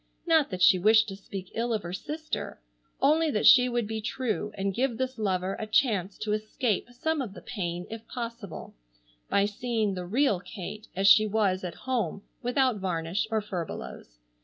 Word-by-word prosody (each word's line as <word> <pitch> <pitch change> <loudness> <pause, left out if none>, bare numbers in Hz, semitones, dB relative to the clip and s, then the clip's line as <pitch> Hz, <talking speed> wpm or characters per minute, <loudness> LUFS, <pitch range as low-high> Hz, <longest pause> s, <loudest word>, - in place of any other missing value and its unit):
Not 320 -4 +4
that 185 -2 -2
she 185 - +7
wished 220 +3 +5
to 195 - -6
speak 195 -1 -8
ill 235 +1 -1
of 215 -3 -1
her 175 +1 -6
sister, 310 - -5 0.4
only 310 +3 +4
that 210 -7 0
she 250 -1 +8
would 240 -2 0
be 220 +1 -4
true 215 -1 -2
and 195 0 -1
give 245 +1 0
this 260 -1 -3
lover 190 -2 0
a 215 - -4
chance 210 -5 +1
to 215 - -2
escape 215 +1 -1
some 300 +5 -1
of 215 -6 -6
the - - -9
pain 175 -5 -4
if 225 0 -8
possible, 235 -4 -6 0.6
by 200 - +3
seeing 215 0 -1
the 180 -1 -5
real 230 -1 +2
Kate 200 +4 -8
as 195 +2 0
she 215 +2 +7
was 195 -3 +1
at 180 - -5
home 220 -7 -1 0.2
without 250 -1 +2
varnish 180 +1 -1
or 220 -1 +1
furbelows. 170 - -6
215 Hz, 185 wpm, -28 LUFS, 190-245 Hz, 0.6 s, she